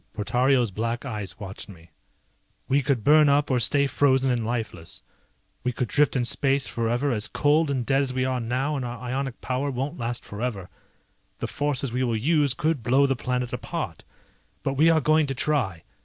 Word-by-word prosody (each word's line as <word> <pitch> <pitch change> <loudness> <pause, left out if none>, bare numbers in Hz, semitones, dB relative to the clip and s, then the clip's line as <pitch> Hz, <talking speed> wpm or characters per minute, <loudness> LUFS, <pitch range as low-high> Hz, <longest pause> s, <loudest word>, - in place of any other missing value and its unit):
Portario's 120 +2 +1
black 115 +6 -3
eyes 105 -7 -5
watched 95 +1 -8
me. 85 -4 -15 0.8
"We 140 +2 +2
could 130 -4 0
burn 150 +3 +6
up 145 0 +2
or 125 - +2
stay 140 +4 +3
frozen 135 -1 +2
and 120 -2 0
lifeless. 110 - -4 0.6
We 125 - 0
could 125 -1 -3
drift 150 0 +2
in 125 -2 +1
space 135 +2 +2
forever 120 +4 -1
as 110 -2 +1
cold 150 +4 +2
and 130 -4 -1
dead 135 +2 +2
as 135 -2 -1
we 130 0 -1
are 130 -1 -1
now 130 +5 -1
and 135 - -3
our 120 -1 -5
ionic 130 +1 -4
power 130 +2 -2
won't 135 +4 -4
last 120 0 -4
forever. 105 -4 -4 0.7
The - - -4
forces 140 -3 -2
we 125 +2 -1
will 115 -3 0
use 145 +1 +2
could 155 -1 0
blow 130 +5 +3
the 135 -1 +1
planet 125 0 -2
apart. - - -5 0.6
But 135 - -1
we 155 +4 +4
are 160 -1 +4
going 155 +1 +3
to 135 - -3
try. 125 - -1
130 Hz, 190 wpm, -25 LUFS, 115-140 Hz, 0.8 s, burn